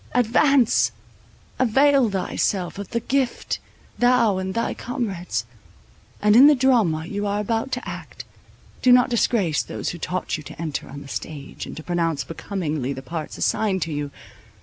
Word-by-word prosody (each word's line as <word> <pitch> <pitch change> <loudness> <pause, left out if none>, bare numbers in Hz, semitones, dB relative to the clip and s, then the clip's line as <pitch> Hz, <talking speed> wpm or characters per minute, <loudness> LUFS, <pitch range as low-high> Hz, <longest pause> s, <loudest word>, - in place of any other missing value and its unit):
Advance! 250 +1 +4 0.7
avail 270 +1 +4
thyself 190 -1 -1
of 200 - -6
the 235 - -1
gift, 260 0 -1 0.4
thou 245 -5 +4
and 190 0 -4
thy 230 - 0
comrades; 190 - -3 0.8
and 210 0 +5
in 265 +4 +9
the 300 - +7
drama 225 - +2
you 205 +3 -3
are 205 +1 0
about 225 +5 -1
to 250 - -3
act, - - -8 0.6
do 255 - +5
not 250 0 +5
disgrace 205 - +2
those - - -4
who 175 - -6
taught 180 +1 -2
you - - -8
to 135 - -11
enter 160 -4 -4
on 140 +1 -8
the - - -12
stage, 140 0 -6
and - - -8
to 160 - -7
pronounce 165 -3 0
becomingly 155 -7 -3
the 135 0 -8
parts 160 +1 -6
assigned 190 -5 +1
to 160 - -4
you! 145 0 -3
200 Hz, 165 wpm, -23 LUFS, 165-245 Hz, 0.8 s, in